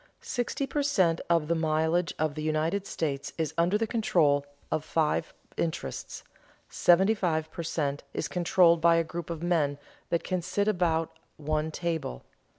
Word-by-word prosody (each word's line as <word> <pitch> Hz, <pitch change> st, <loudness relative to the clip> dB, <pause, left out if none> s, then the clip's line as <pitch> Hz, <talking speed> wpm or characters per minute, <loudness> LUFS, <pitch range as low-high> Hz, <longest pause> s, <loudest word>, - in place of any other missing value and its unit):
Sixty 245 Hz, +3 st, -2 dB
per 290 Hz, +2 st, -1 dB
cent. 190 Hz, -, +2 dB
of 165 Hz, -3 st, +3 dB
the 170 Hz, -, +2 dB
mileage 160 Hz, +1 st, +1 dB
of 155 Hz, -1 st, 0 dB
the 155 Hz, -, -5 dB
United 155 Hz, +6 st, 0 dB
States 140 Hz, -3 st, -3 dB
is 160 Hz, -2 st, -1 dB
under 175 Hz, +5 st, +2 dB
the 225 Hz, -, 0 dB
control 170 Hz, -, +2 dB, 0.3 s
of 155 Hz, -, 0 dB
five 155 Hz, 0 st, 0 dB, 0.3 s
interests; 155 Hz, -, -4 dB, 0.5 s
seventy 190 Hz, +5 st, +4 dB
five 160 Hz, -6 st, -1 dB
per -, -, -5 dB
cent. 145 Hz, -3 st, -2 dB
is -, -, -3 dB
controlled 170 Hz, -1 st, +3 dB
by 170 Hz, 0 st, +5 dB
a 165 Hz, -, +3 dB
group 165 Hz, +1 st, -6 dB
of 165 Hz, -1 st, -5 dB
men 155 Hz, -5 st, +1 dB, 0.3 s
that 170 Hz, -, 0 dB
can 185 Hz, -1 st, -1 dB
sit 185 Hz, +4 st, -1 dB
about 170 Hz, -5 st, 0 dB, 0.2 s
one 155 Hz, +1 st, -1 dB
table. 160 Hz, -, -3 dB
165 Hz, 160 wpm, -28 LUFS, 155-180 Hz, 0.5 s, by